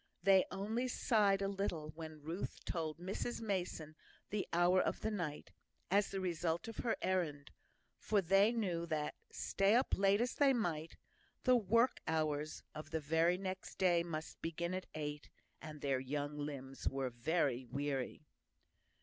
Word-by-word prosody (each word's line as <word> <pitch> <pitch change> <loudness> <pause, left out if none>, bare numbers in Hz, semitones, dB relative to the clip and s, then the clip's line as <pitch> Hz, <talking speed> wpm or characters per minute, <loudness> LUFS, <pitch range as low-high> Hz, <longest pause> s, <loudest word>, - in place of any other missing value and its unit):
They 190 0 +6
only 220 +6 -1
sighed 205 -6 +3
a - - +1
little 190 -6 -2
when 155 -1 -9
Ruth 165 +5 -5
told 160 -2 -2
Mrs 190 +7 -3
Mason 180 -7 -3 0.4
the 205 -1 -1
hour 175 +2 +4
of - - -1
the 220 - 0
night, 170 -8 -4 0.4
as 200 +1 +4
the 195 - -3
result 170 0 -1
of 225 - -7
her 230 - 0
errand; 160 -6 -1 0.5
for 210 - +2
they 195 +4 +5
knew 180 -8 -1
that, 155 -2 -1 0.2
stay 195 +3 +2
up 255 +3 +3
as - - +2
late 195 +1 +5
as 245 +1 +1
they 280 -2 +4
might, 170 -9 -2 0.5
the 255 -1 +6
work 230 +3 +3
hours 155 -1 -1
of 155 0 -7
the 160 +3 +2
next 185 -1 -5
day 175 -2 +4
must 160 -2 -5
begin 170 +2 -2
at 185 0 -3
eight, 150 -1 -4 0.3
and 155 -2 -8
their 135 -2 +1
young 145 +2 -3
limbs 140 -2 -4
were 135 -2 -2
very 130 0 +1
weary. 140 +1 -2
170 Hz, 160 wpm, -37 LUFS, 150-195 Hz, 0.5 s, They